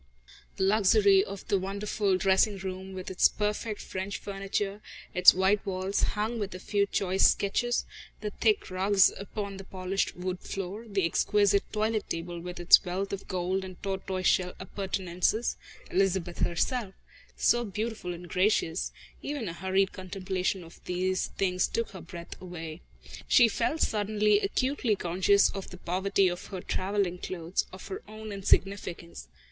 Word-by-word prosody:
The - - 0
luxury 200 -1 +5
of 200 -1 -8
the 200 - +2
wonderful 200 0 0
dressing 195 +2 +3
room, 190 0 -6
with 185 0 -6
its 185 - +5
perfect 210 +1 -2
French 190 +2 -4
furniture, 195 +1 -3 0.3
its 180 0 +9
white 190 +2 +2
walls 190 0 -1 0.2
hung 225 +3 -1
with 200 -2 -4
a - - -7
few 200 +1 +1
choice 190 -1 +3
sketches, 240 +4 0 0.3
the 210 -1 -4
thick 215 -2 +1
rugs 195 +1 +4
upon 200 0 -5
the 195 - -8
polished 190 +1 -2
wood 180 0 -3
floor, 195 +5 -6
the 195 -3 +1
exquisite 200 +3 +2
toilet 215 0 -1
table 170 +1 -4
with 175 +1 -7
its 175 +3 +7
wealth 190 +2 -3
of 195 - -5
gold 185 +1 -1
and 185 -1 -9
tortoiseshell 185 -2 0
appurtenances 190 +2 -1 0.4
Elizabeth 190 -2 0
herself, 200 +3 0 0.4
so 240 0 +3
beautiful 215 -2 -4
and 175 0 -8
gracious 180 -2 +1 0.3
even 285 -6 -3
a 165 - -4
hurried 190 +2 +1
contemplation 185 0 -3
of 165 0 -14
all - - -34
these 185 +1 0
things 185 -2 +1
took 230 0 -2
her 190 -3 -9
breath 170 0 -10
away. 165 -3 -7 0.5
She 240 - +7
felt 305 +8 -1
suddenly 210 0 +2
acutely 245 +2 0
conscious 190 +3 +3
of 195 -1 -6
the 180 - -10
poverty 190 +2 +1
of 175 0 -4
her 190 -3 -6
travelling 190 -2 -1
clothes, 175 -1 -2
of 185 - -10
her 190 - -5
own 215 0 -8
insignificance. 190 - 0
195 Hz, 150 wpm, -29 LUFS, 185-205 Hz, 0.5 s, its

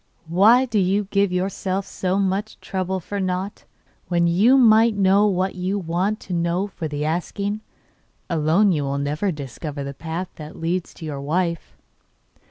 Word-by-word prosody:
'Why 210 +10 +5
do 225 -4 0
you 195 +2 +2
give 200 -1 +2
yourself 190 +1 -2
so 185 0 -2
much 200 +2 -1
trouble 190 0 -2
for 200 +3 -5
nought, 185 +1 -3 0.4
when 170 -1 +2
you 200 +10 +5
might 225 -2 +5
know 200 +1 +4
what 190 -1 0
you 185 +2 -2
want 185 +4 -1
to 185 - -6
know 170 +2 0
for 185 -5 -5
the 150 0 -3
asking? 200 +6 -2 0.7
Alone 170 +5 +3
you 155 -4 0
will 140 0 -2
never 150 +8 -1
discover 145 0 -6
the 140 0 -5
path 165 +5 -5
that 155 0 -9
leads 170 +2 -2
to 160 - -9
your 145 -3 -5
wife. 170 +3 -2
185 Hz, 165 wpm, -22 LUFS, 165-200 Hz, 0.7 s, Why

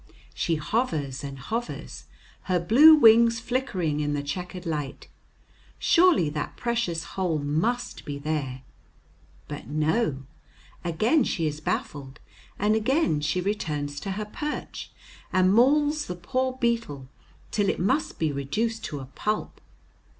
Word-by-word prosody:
She 165 - 0
hovers 155 - -2
and 140 -1 -6
hovers, 230 - -5 0.4
her 180 -2 +1
blue 275 - +8
wings 230 -3 +6
flickering 220 - -1
in 145 -1 -1
the 145 - -2
checkered 180 +4 -5
light; 150 -4 -4 0.7
surely 345 - +4
that 150 0 -4
precious 230 -9 -1
hole 180 -5 -2
must 160 +13 -1
be 145 -1 -5
there; 140 -3 -3 0.8
but - - -7
no, 155 - 0 0.6
again 215 - +2
she 165 -7 -1
is 150 0 -3
baffled, 135 -2 -4 0.4
and 210 +2 +2
again 220 - +1
she 155 +5 0
returns 150 -7 -2
to 195 - -4
her 210 +2 -4
perch, 295 +8 -5 0.4
and 185 0 +4
mauls 295 +6 +3
the 180 - -4
poor 255 +9 -1
beetle 230 - -1 0.4
till 205 -2 +1
it - - -1
must 235 - 0
be 160 -2 0
reduced 215 +12 -2
to 145 -3 -5
a - - -7
pulp. 210 +11 -3
180 Hz, 135 wpm, -26 LUFS, 150-235 Hz, 0.8 s, blue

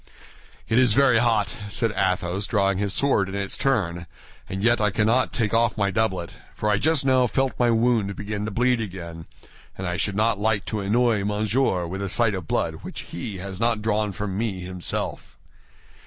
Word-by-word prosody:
"It 110 - +3
is 125 -4 +4
very 130 -4 +5
hot," 110 -5 +1
said 115 +1 0
Athos, 90 +1 0
drawing 100 -3 +1
his 100 -1 0
sword 105 -6 +2
in 95 - -5
its 100 -1 -3
turn, 90 -10 0 0.4
"and 95 +1 -4
yet 120 0 +3
I 105 - +3
cannot 110 +5 +2
take 115 -4 -1
off 115 0 +2
my 100 -1 +1
doublet; 95 -5 -1 0.2
for 105 - 0
I 105 - +2
just 155 0 +1
now 130 -2 +4
felt 135 +2 0
my 120 -1 +4
wound 115 -3 +2
begin 105 +1 -4
to - - -2
bleed 120 +3 +1
again, 85 -5 -7 0.5
and 95 - -4
I 90 0 -2
should 100 0 0
not 110 0 +2
like 105 -1 +1
to 110 - -3
annoy 110 +1 +2
Monsieur 105 -2 0
with 95 +4 -5
the 100 - -2
sight 115 +3 +2
of 90 -4 -5
blood - - -1
which - - -6
he 95 +3 -6
has 95 0 -6
not 115 -2 +1
drawn 105 -1 0
from 100 0 -4
me 105 -5 -2
himself." 90 0 -5
105 Hz, 195 wpm, -24 LUFS, 95-115 Hz, 0.5 s, very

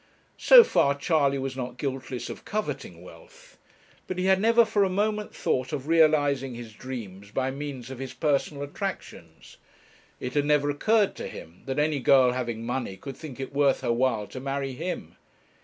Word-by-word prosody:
So - - +9
far 140 - +2
Charley 140 -2 +1
was 135 -1 -4
not 125 -1 -5
guiltless 130 -2 -4
of - - -8
coveting 215 0 -4
wealth; - - -16 0.5
but 185 - -4
he 185 - -1
had 190 0 +4
never 230 +1 +5
for 215 -2 +2
a 195 - +1
moment 210 +2 -1
thought 130 0 -1
of 145 -1 -4
realizing 145 -5 +3
his 115 -2 -9
dreams 105 -6 -8
by 130 +4 -1
means 135 -3 -6
of 130 - -8
his 135 -1 -5
personal 145 -1 -1
attractions. 145 - -7 0.6
It 125 0 -5
had 145 -1 +1
never 145 -1 +2
occurred 210 +8 +2
to - - -5
him 85 +2 -11
that 135 - -3
any 150 -1 +1
girl 130 0 +5
having 120 -2 -3
money 120 -5 -3
could 135 +4 -8
think 145 -5 -9
it 135 +1 -6
worth 140 -1 +2
her 120 - +1
while 115 -3 +1
to 130 - -7
marry 135 0 -3
him. 170 +7 -5
140 Hz, 180 wpm, -26 LUFS, 130-160 Hz, 0.6 s, So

